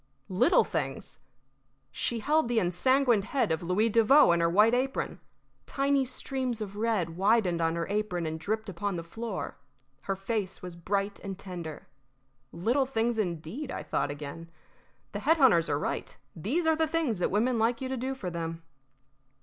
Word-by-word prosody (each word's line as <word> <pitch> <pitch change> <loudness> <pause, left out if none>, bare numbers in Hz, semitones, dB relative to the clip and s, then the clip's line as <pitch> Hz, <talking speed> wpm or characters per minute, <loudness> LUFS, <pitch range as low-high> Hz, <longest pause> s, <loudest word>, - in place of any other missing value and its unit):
Little 185 0 +4
things! 145 -8 -4 0.7
She 230 - -2
held 305 +4 +2
the 240 -1 0
ensanguined 225 +5 +2
head 250 -4 0
of 160 - 0
Louis 180 +6 +1
Devoe 230 +2 +6
in 170 - +3
her 170 0 +3
white 210 +6 +5
apron. 260 +2 -1 0.5
Tiny 275 -1 +1
streams 255 -1 -3
of 205 -2 -5
red 210 -6 0
widened 195 -4 +3
on 165 0 +1
her 170 0 -1
apron 205 -4 -1
and 160 0 -3
dripped 215 +7 -2
upon 195 +1 -3
the 170 - -4
floor. 225 +7 -5 0.4
Her 195 - -2
face 195 0 -3
was 180 -1 -7
bright 195 +4 -2
and 195 -1 -6
tender. 175 -6 -7 0.6
"Little 240 +11 +1
things, 230 -2 0
indeed!" 185 - -3
I - - -4
thought - - -1
again. 145 +3 -7 0.6
"The - - -4
head 325 +2 +3
hunters 230 - +5
are 145 - +1
right. - - -3 0.2
These 260 - -1
are 320 0 +4
the 320 0 +1
things 310 - 0
that - - +1
women 230 +4 +1
like 230 +1 +2
you 260 - -3
to 265 - -2
do 260 +2 -3
for 185 -9 -5
them." 165 -1 -5
210 Hz, 175 wpm, -29 LUFS, 170-250 Hz, 0.7 s, Devoe